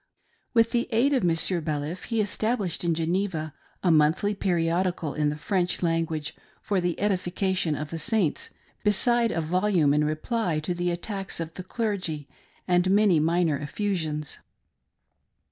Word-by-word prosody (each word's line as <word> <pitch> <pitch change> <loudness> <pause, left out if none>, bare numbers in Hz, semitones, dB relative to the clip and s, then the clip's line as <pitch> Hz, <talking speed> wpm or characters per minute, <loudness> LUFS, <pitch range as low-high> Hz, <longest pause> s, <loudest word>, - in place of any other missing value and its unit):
With 230 0 +4
the 240 0 0
aid 245 +6 +3
of 260 - +2
Monsieur 170 +1 +2
Baliff, 155 +3 -3
he 230 -2 0
established 205 -4 -1
in 170 -1 +1
Geneva 165 -2 -1 0.3
a 180 - +4
monthly 160 +6 +3
periodi 175 -1 0
cal 155 -4 -3
in 150 -1 +1
the 150 - -2
French 180 +3 -1
language, 165 -2 -1 0.3
for 200 -4 -1
the 175 -1 -1
edification 185 -3 0
of 150 +1 -5
the 165 - -4
Saints, 215 -6 0 0.3
beside 230 +3 +4
a 165 - -1
volume 175 -2 +2
in 150 +1 +3
reply 155 +3 -1
to 165 +4 -2
the 175 0 -1
attacks 195 +2 -3
of 165 -1 -5
the 185 - -7
clergy, 185 - -3 0.4
and 180 0 +3
many 200 -4 +4
minor 165 -1 +2
effusions. 155 -2 -3
175 Hz, 150 wpm, -26 LUFS, 160-205 Hz, 0.4 s, With